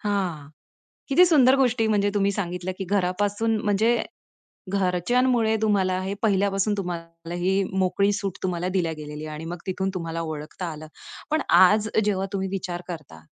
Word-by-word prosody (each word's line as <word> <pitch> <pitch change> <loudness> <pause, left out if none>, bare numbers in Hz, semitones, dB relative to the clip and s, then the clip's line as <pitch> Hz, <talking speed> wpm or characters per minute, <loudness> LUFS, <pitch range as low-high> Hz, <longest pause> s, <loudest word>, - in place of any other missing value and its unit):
हां. 185 -8 -2 0.6
किती 350 +7 +6
सुंदर 270 -7 +5
गोष्टी 245 -4 +2
म्हणजे 205 -1 +2
तुम्ही 200 0 +2
सांगितल्या 180 -1 -3
की 195 - -3
घरापासून 205 +4 0
म्हणजे, 220 +3 +2 0.7
घरच्यांमुळे 220 +5 +2
तुम्हाला 190 -4 +2
हे 190 +1 -3
पहिल्यापासून 200 -1 +1
तुम्हाला 165 -2 -6
ही 190 +3 +1 0.2
मोकळी 200 +2 +2
सूट 195 -2 -3
तुम्हाला 180 -1 -1
दिल्या 170 -3 +1
गेलेली 150 0 -7
आहे. 155 - -6
आणि 160 +2 -7
मग 175 +2 -5
तिथून 190 +1 -1
तुम्हाला 165 -2 -4
ओळखता 155 +2 -6
आलं. 155 0 -9 0.4
पण 310 - +2
आज 210 +3 +5 0.2
जेव्हा 195 -2 0
तुम्ही 190 -1 -1
विचार 180 -2 -4
करता. 150 - -8
190 Hz, 155 wpm, -24 LUFS, 175-205 Hz, 0.7 s, किती